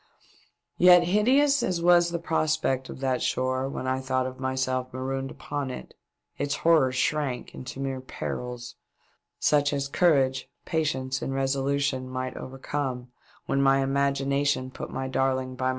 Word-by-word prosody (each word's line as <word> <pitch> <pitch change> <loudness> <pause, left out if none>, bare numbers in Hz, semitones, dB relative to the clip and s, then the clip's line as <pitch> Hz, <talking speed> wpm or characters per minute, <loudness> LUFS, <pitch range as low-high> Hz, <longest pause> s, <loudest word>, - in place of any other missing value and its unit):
Yet, 180 0 +8
hideous 255 +10 +3
as 180 -5 0
was 175 0 +5
the 170 - -2
prospect 155 -5 0
of - - -8
that 130 -2 0
shore 130 +1 0
when 135 - -5
I 130 0 0
thought 130 -1 -1
of 130 0 -6
myself 130 -1 -1
marooned 135 +1 -3
upon 145 -1 -4
it, 125 - -8 0.5
its 145 0 0
horrors 150 -6 +3
shrunk 130 -1 -1
into 130 +1 -8
mere 135 -1 -3
perils, 125 -1 -6 0.6
such 145 -1 +2
as 140 -1 -1
courage, 135 -4 +2 0.2
patience 130 -5 -1
and 135 - -3
resolution 135 -1 0
might 130 0 -4
overcome, 130 -2 -4 0.3
when 140 - +1
my 135 0 +4
imagination 140 -1 0
put - - -7
my 130 0 -4
darling 130 -1 0
by 130 +1 -1
m. - - +2
135 Hz, 150 wpm, -26 LUFS, 130-145 Hz, 0.6 s, Yet